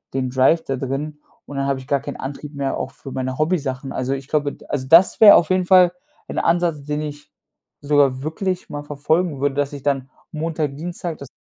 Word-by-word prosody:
den 130 Hz, -2 st, -1 dB
Drive 135 Hz, +6 st, +3 dB
da 135 Hz, -, -2 dB
drin 140 Hz, +3 st, -4 dB, 0.3 s
und 145 Hz, -, -9 dB
dann 135 Hz, 0 st, 0 dB
habe 140 Hz, -, 0 dB
ich 130 Hz, -, -12 dB
gar 140 Hz, -1 st, +1 dB
kein -, -, -7 dB
Antrieb 145 Hz, +2 st, -7 dB
mehr 140 Hz, -1 st, -2 dB
auch -, -, -3 dB
für 135 Hz, 0 st, -11 dB
meine 130 Hz, 0 st, -3 dB
Hobbysachen. 145 Hz, -5 st, -1 dB
Also 130 Hz, +1 st, -2 dB
ich 135 Hz, -1 st, -6 dB
glaube, 145 Hz, -1 st, 0 dB
d -, -, -16 dB
also 130 Hz, -2 st, -3 dB
das 175 Hz, +8 st, +6 dB
wäre 210 Hz, -, +10 dB
auf 170 Hz, +1 st, +3 dB
jeden 185 Hz, -1 st, +2 dB
Fall 180 Hz, -2 st, +6 dB, 0.4 s
ein -, -, -3 dB
Ansatz, 165 Hz, -4 st, +1 dB
den 150 Hz, +1 st, -3 dB
ich 145 Hz, 0 st, -8 dB, 0.5 s
sogar 140 Hz, -2 st, +2 dB
wirklich 185 Hz, +4 st, -3 dB
mal 145 Hz, 0 st, -4 dB
verfolgen 150 Hz, +2 st, -1 dB
würde, 140 Hz, 0 st, 0 dB
dass 145 Hz, 0 st, -1 dB
ich 140 Hz, -2 st, -8 dB
dann 135 Hz, -2 st, -1 dB, 0.2 s
Montag, 155 Hz, -2 st, -3 dB
Dienstag 170 Hz, +1 st, -5 dB
dass 140 Hz, -2 st, -10 dB
145 Hz, 215 wpm, -21 LUFS, 135-160 Hz, 0.5 s, wäre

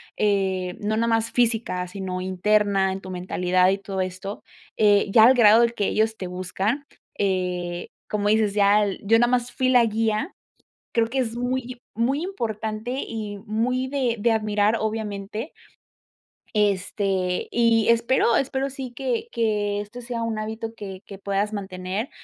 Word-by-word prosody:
eh, 190 Hz, -3 st, 0 dB
no 215 Hz, +1 st, -1 dB
nada 230 Hz, +1 st, +1 dB
más 225 Hz, 0 st, +1 dB
física, 225 Hz, -7 st, 0 dB
sino 185 Hz, -1 st, -5 dB
interna, 195 Hz, +1 st, +2 dB
en 190 Hz, +1 st, -5 dB
tu 185 Hz, -, -9 dB
mentalidad 180 Hz, 0 st, +1 dB
y 195 Hz, +1 st, 0 dB
todo 195 Hz, -1 st, -4 dB
esto, 185 Hz, +2 st, -5 dB, 0.3 s
eh, 205 Hz, -1 st, +4 dB
ya 220 Hz, +1 st, +8 dB
el 255 Hz, -, +7 dB
grado 225 Hz, -1 st, +7 dB
del 235 Hz, 0 st, +2 dB
que 205 Hz, -, -1 dB
ellos 220 Hz, +1 st, +1 dB
te 185 Hz, -, -5 dB
buscan, 190 Hz, +8 st, -2 dB, 0.3 s
eh, 180 Hz, -3 st, -1 dB, 0.2 s
como 205 Hz, -1 st, -1 dB
dices, 215 Hz, -1 st, +2 dB
ya 205 Hz, 0 st, +4 dB, 0.2 s
yo 220 Hz, +2 st, +4 dB
nada 240 Hz, +1 st, +3 dB
más 245 Hz, -1 st, 0 dB
fui 255 Hz, 0 st, 0 dB
la 250 Hz, -2 st, +6 dB
guía, 220 Hz, -, -1 dB, 0.6 s
creo 230 Hz, -1 st, +2 dB
que 265 Hz, +3 st, -3 dB
es 235 Hz, -3 st, -1 dB
muy 250 Hz, 0 st, -2 dB, 0.2 s
muy 260 Hz, +8 st, 0 dB
importante 220 Hz, -, -3 dB
y 210 Hz, -2 st, -5 dB
muy 245 Hz, +4 st, -1 dB
de 260 Hz, -4 st, 0 dB
de 230 Hz, +3 st, +2 dB
admirar 215 Hz, 0 st, +2 dB
obviamente 215 Hz, +2 st, -4 dB, 1.0 s
este, 195 Hz, -2 st, 0 dB
y 230 Hz, -2 st, +3 dB
espero 235 Hz, 0 st, +3 dB
espero 270 Hz, 0 st, 0 dB
sí 260 Hz, -2 st, -7 dB
que 255 Hz, -3 st, -2 dB
que 210 Hz, -3 st, 0 dB
este 225 Hz, +4 st, -9 dB
sea 235 Hz, -1 st, -4 dB
un 225 Hz, -1 st, -2 dB
hábito 220 Hz, +1 st, -5 dB
que 195 Hz, -3 st, -8 dB
que 200 Hz, -, -9 dB
puedas 200 Hz, +1 st, -1 dB
mantener 195 Hz, +2 st, -4 dB
215 Hz, 160 wpm, -24 LUFS, 195-235 Hz, 1.0 s, ya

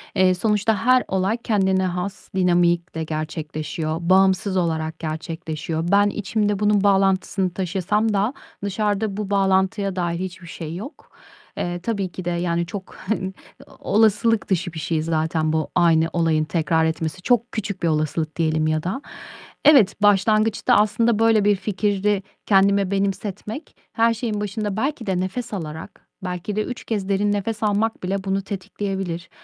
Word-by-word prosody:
eee, 185 Hz, -1 st, +4 dB
sonuçta 210 Hz, +1 st, +1 dB
her 255 Hz, 0 st, +5 dB
olay 190 Hz, +4 st, 0 dB
kendine 190 Hz, -4 st, +1 dB
has 180 Hz, +2 st, -4 dB
dinamikle 175 Hz, -2 st, +2 dB
gerçekleşiyor. 155 Hz, 0 st, -4 dB
Bağımsız 190 Hz, +2 st, +3 dB
olarak 160 Hz, -2 st, -1 dB
gerçekleşiyor. 160 Hz, 0 st, -4 dB
Ben 205 Hz, +1 st, +5 dB
içimde 205 Hz, 0 st, -1 dB
bunun 210 Hz, -1 st, +3 dB
bağlantısını 195 Hz, -2 st, +2 dB
taşısam 200 Hz, +4 st, 0 dB
da 205 Hz, +6 st, +1 dB, 0.3 s
dışarıda 205 Hz, 0 st, -1 dB
bu 210 Hz, -2 st, -3 dB
bağlantıya 195 Hz, 0 st, +1 dB
dair 175 Hz, -2 st, -1 dB
hiçbir 185 Hz, -1 st, -6 dB
şey 160 Hz, 0 st, -6 dB
yok. 225 Hz, -, -9 dB, 0.5 s
Eee, 175 Hz, 0 st, -2 dB
tabii 195 Hz, -1 st, -2 dB
ki 185 Hz, -, -7 dB
de, -, -, 0 dB
yani, 170 Hz, 0 st, 0 dB
çok, 190 Hz, +2 st, -8 dB
hani, 190 Hz, -3 st, -3 dB, 0.5 s
olasılık 220 Hz, +1 st, +2 dB
dışı 180 Hz, -2 st, 0 dB
bir 160 Hz, -, -5 dB
şey 160 Hz, 0 st, -1 dB
zaten 160 Hz, 0 st, 0 dB
bu 160 Hz, -1 st, 0 dB
aynı 165 Hz, -2 st, +4 dB
olayın 165 Hz, -2 st, +2 dB
tekrar 160 Hz, 0 st, +1 dB
etmesi. 160 Hz, +2 st, -2 dB
Çok 245 Hz, +3 st, +3 dB, 0.4 s
bir -, -, +3 dB
olasılık 155 Hz, 0 st, -1 dB
diyelim 155 Hz, -1 st, +1 dB
ya 155 Hz, 0 st, 0 dB
da. 190 Hz, +10 st, -3 dB, 0.6 s
Evet, 245 Hz, -10 st, +6 dB
başlangıçta 215 Hz, +4 st, +3 dB
aslında 220 Hz, +1 st, +3 dB
böyle 225 Hz, -2 st, +4 dB
bir 205 Hz, -1 st, +4 dB
fikri 200 Hz, 0 st, 0 dB, 0.2 s
kendime 200 Hz, -1 st, +3 dB
benimsetmek 200 Hz, -, -3 dB, 0.2 s
her 230 Hz, 0 st, +3 dB
şeyin 220 Hz, -2 st, -3 dB
başında 210 Hz, 0 st, -3 dB
belki 270 Hz, -1 st, -2 dB
de 190 Hz, -2 st, 0 dB
nefes 190 Hz, +6 st, -3 dB
alarak, 160 Hz, -5 st, -7 dB, 0.2 s
belki 180 Hz, +2 st, -4 dB
de 215 Hz, -, +1 dB
3 250 Hz, -, -6 dB
kez 205 Hz, -3 st, -2 dB
derin 205 Hz, +1 st, +2 dB
nefes 210 Hz, +2 st, -2 dB
almak 215 Hz, +1 st, 0 dB
bile 190 Hz, +1 st, -2 dB
bunu 195 Hz, 0 st, 0 dB
tetikleyebilir. 195 Hz, -3 st, -4 dB
190 Hz, 145 wpm, -22 LUFS, 170-210 Hz, 0.6 s, Evet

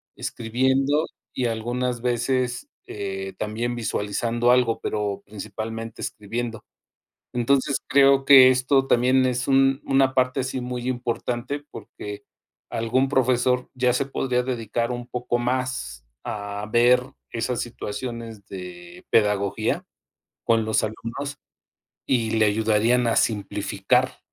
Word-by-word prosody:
escribiendo 130 Hz, +6 st, +1 dB, 0.3 s
y 125 Hz, -, -1 dB
algunas 120 Hz, +2 st, -2 dB
veces, 125 Hz, 0 st, -1 dB, 0.2 s
eh, 95 Hz, -1 st, -5 dB
también 115 Hz, +3 st, -2 dB
visualizando 115 Hz, +1 st, 0 dB
algo, 125 Hz, -2 st, +3 dB
pero 105 Hz, -2 st, -2 dB
principalmente 110 Hz, +2 st, -6 dB
escribiendo. 115 Hz, +1 st, -4 dB, 0.7 s
Entonces 135 Hz, +3 st, +2 dB
creo 135 Hz, -1 st, +5 dB
que 130 Hz, -2 st, +9 dB
esto 130 Hz, +1 st, +2 dB
también 130 Hz, +2 st, +4 dB
es 125 Hz, -1 st, -1 dB
un 135 Hz, 0 st, +3 dB
una 135 Hz, -1 st, +3 dB
parte 130 Hz, +1 st, +1 dB
así 130 Hz, 0 st, -3 dB
muy 125 Hz, 0 st, -4 dB
importante, 120 Hz, +3 st, -3 dB
porque 105 Hz, 0 st, -8 dB, 0.5 s
algún 125 Hz, +4 st, +1 dB
profesor 125 Hz, -1 st, +2 dB
ya 125 Hz, -1 st, +2 dB
se 135 Hz, +2 st, 0 dB
podría 125 Hz, -2 st, -1 dB
dedicar 115 Hz, -1 st, -2 dB
un 120 Hz, 0 st, -5 dB
poco 120 Hz, -1 st, -2 dB
más 125 Hz, -, -2 dB, 0.2 s
a 105 Hz, 0 st, -4 dB
ver 120 Hz, +2 st, +5 dB, 0.3 s
esas 120 Hz, +1 st, -2 dB
situaciones 115 Hz, -2 st, -6 dB
de 175 Hz, -, -9 dB
pedagogía 105 Hz, -2 st, +1 dB, 0.6 s
con 115 Hz, -1 st, +3 dB
los 110 Hz, 0 st, +1 dB
alumnos 115 Hz, +6 st, -5 dB, 0.7 s
y 115 Hz, -4 st, +2 dB
le 110 Hz, -1 st, +3 dB
ayudarían 110 Hz, +3 st, +2 dB
a 115 Hz, -, +2 dB
simplificar 105 Hz, -3 st, 0 dB
120 Hz, 115 wpm, -24 LUFS, 110-130 Hz, 0.7 s, que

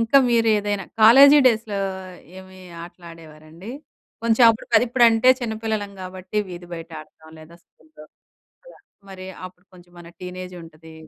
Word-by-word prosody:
ఇంకా 230 Hz, +4 st, +3 dB
మీరు 230 Hz, -1 st, +2 dB
ఏదైనా 205 Hz, -1 st, -4 dB, 0.2 s
కాలేజీ 275 Hz, +7 st, +7 dB
డేస్‌లో 220 Hz, -4 st, 0 dB, 0.6 s
ఏమి 190 Hz, 0 st, -15 dB, 0.2 s
ఆటలు 175 Hz, +1 st, -14 dB
ఆడేవారండి? 160 Hz, +4 st, -14 dB, 0.5 s
కొంచెం 230 Hz, +1 st, +3 dB
అప్పుడు 225 Hz, -, -6 dB
అది 230 Hz, -, +3 dB
ఇప్పుడంటే 235 Hz, 0 st, +3 dB
చిన్న 225 Hz, -2 st, -4 dB
పిల్లలం 210 Hz, -2 st, -3 dB
గాబట్టి 185 Hz, +2 st, -9 dB
వీధి 175 Hz, -1 st, -11 dB
బయట 165 Hz, 0 st, -10 dB
ఆడతాం. 160 Hz, +1 st, -19 dB
లేదా 165 Hz, +2 st, -16 dB
స్కూల్‌లో 155 Hz, -1 st, -20 dB, 0.6 s
అలా. -, -, -17 dB, 0.3 s
మరి 185 Hz, -1 st, -10 dB, 0.2 s
అప్పుడు 185 Hz, 0 st, -19 dB
కొంచెం 175 Hz, -1 st, -19 dB
మన 170 Hz, -, -13 dB
టీనేజుంటది. 175 Hz, -3 st, -11 dB
185 Hz, 140 wpm, -21 LUFS, 170-225 Hz, 0.6 s, కాలేజీ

